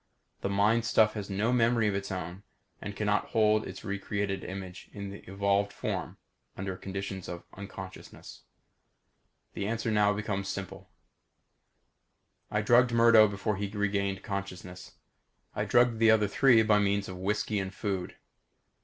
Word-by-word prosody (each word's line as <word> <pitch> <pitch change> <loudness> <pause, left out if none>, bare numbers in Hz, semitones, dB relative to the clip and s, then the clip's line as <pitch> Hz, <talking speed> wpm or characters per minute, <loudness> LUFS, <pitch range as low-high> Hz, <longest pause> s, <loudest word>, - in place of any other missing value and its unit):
The - - -1
mind 105 +4 +3
stuff 110 -1 +3
has 105 -2 -6
no 105 +5 0
memory 115 -2 +3
of 105 - +1
its 100 0 -3
own 90 0 -5 0.4
and 100 0 -6
cannot 105 0 +1
hold 110 -1 +2
its - - -9
recreated 100 -1 -3
image 95 -1 -8
in 100 -1 -6
the 100 - -9
evolved 100 +1 +1
form - - -4 0.4
under 95 0 -4
conditions 95 -1 -6
of 85 -1 -6
unconsciousness. 95 -1 -10 1.1
The 100 - -3
answer 115 +1 -1
now 105 -1 +4
becomes 105 -2 -3
simple. 95 -1 -6 1.6
I 105 0 0
drugged 120 +2 +5
Murdo 115 -2 +7
before 100 +1 -2
he 100 +1 -2
regained 100 -2 -1
consciousness. 95 -3 -6 0.6
I - - -1
drugged 120 -2 +3
the 115 0 +5
other 110 -2 +5
three 115 +1 +5
by 105 -1 +4
means 100 0 +1
of 95 - -7
whisky 105 +2 -1
and 95 -1 -3
food. 95 -2 -4
100 Hz, 145 wpm, -29 LUFS, 95-110 Hz, 1.6 s, Murdo